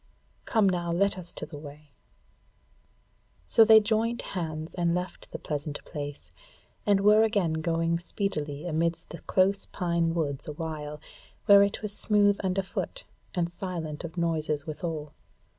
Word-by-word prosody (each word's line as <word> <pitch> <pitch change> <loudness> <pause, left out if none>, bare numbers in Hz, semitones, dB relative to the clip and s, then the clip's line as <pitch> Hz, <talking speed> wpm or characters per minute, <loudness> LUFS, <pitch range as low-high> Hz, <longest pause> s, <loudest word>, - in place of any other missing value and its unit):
Come 220 -4 +3
now, 175 -2 0
let 200 +4 +2
us 175 -2 -8
to - - -5
the 150 - -9
way." 145 0 -12 1.5
So 225 - +6
they 220 0 +8
joined 225 +2 0
hands 160 -3 -4
and 170 -1 +1
left 180 +1 -5
the - - -6
pleasant 145 -1 -4
place, 145 -1 -7 0.6
and 200 -1 +4
were 210 +2 +6
again 205 -7 +2
going 165 +1 0
speedily 155 -5 -3
amidst 170 0 -1
the 170 - -7
close 195 +1 +2
pine 170 -2 0
woods 145 -4 -2
awhile, 150 -1 -5 0.5
where 200 0 +8
it 200 +1 +1
was 210 -1 -1
smooth 205 -1 +3
underfoot 195 - -2 0.3
and 175 -2 +1
silent 170 -5 -5
of 170 +1 -7
noises 155 -3 0
withal. 155 -1 -5
170 Hz, 140 wpm, -28 LUFS, 155-200 Hz, 1.5 s, they